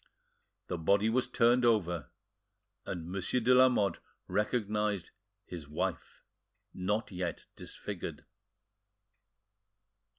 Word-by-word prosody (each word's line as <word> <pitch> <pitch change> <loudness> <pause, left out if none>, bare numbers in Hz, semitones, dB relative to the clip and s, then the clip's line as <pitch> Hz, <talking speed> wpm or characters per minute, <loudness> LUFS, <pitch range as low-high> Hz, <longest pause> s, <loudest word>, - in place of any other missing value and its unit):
The 90 - -4
body 100 +6 +3
was 125 +2 +1
turned 120 +1 +4
over, 90 -9 +2 0.8
and 85 -3 -4
Monsieur 95 +6 0
de 125 +2 +4
Lamotte 125 -7 +4 0.3
recognised 105 -2 0 0.3
his 85 -5 -8
wife, 75 - -3 0.5
not 105 +5 -1
yet 90 -2 -4
disfigured. - - -6
100 Hz, 90 wpm, -32 LUFS, 90-115 Hz, 0.8 s, turned